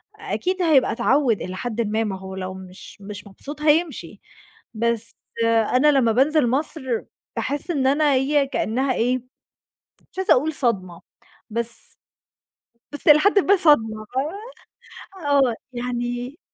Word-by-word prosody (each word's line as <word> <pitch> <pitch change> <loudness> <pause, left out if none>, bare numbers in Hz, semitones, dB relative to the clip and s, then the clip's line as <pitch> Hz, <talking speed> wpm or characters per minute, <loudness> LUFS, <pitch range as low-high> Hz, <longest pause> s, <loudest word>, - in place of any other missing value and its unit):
أكيد 370 0 -3
هيبقى 310 -6 +4
اتعوّد 255 -3 +2
إلى 185 +1 -5
حدٍ 235 +2 -3
ما، 220 +1 0
ما 195 -3 -3
هو 190 0 -8
لو 185 0 -5
مش 190 +2 -12
مش 205 +1 -9
مبسوط 285 +10 -9
هيمشي، 310 +1 0 0.5
بس 230 0 -1 0.3
أنا 230 +6 +3
لمّا 255 -5 +3
بانزل 275 +2 +3
مصر 290 +3 -2 0.5
باحس 290 +5 -2
إن 270 -4 +1
أنا 290 +1 +3
هي 275 +1 +2
كأنها 260 +1 -1
إيه، 250 +2 +1 1.0
مش - - -16
عايزة 380 +2 +4
أقول 305 +5 0
صدمة. 195 - -2 0.5
بس 235 +1 -5 1.0
بس 290 - -5
إلى 300 0 +8
حدٍ 405 +3 +4
ما 400 +1 +4
صدمة 225 - +2 0.9
فاهمة، 295 -7 -3
آه، 255 -5 +3 0.2
يعني 245 +3 -4
255 Hz, 135 wpm, -22 LUFS, 225-295 Hz, 1.0 s, إلى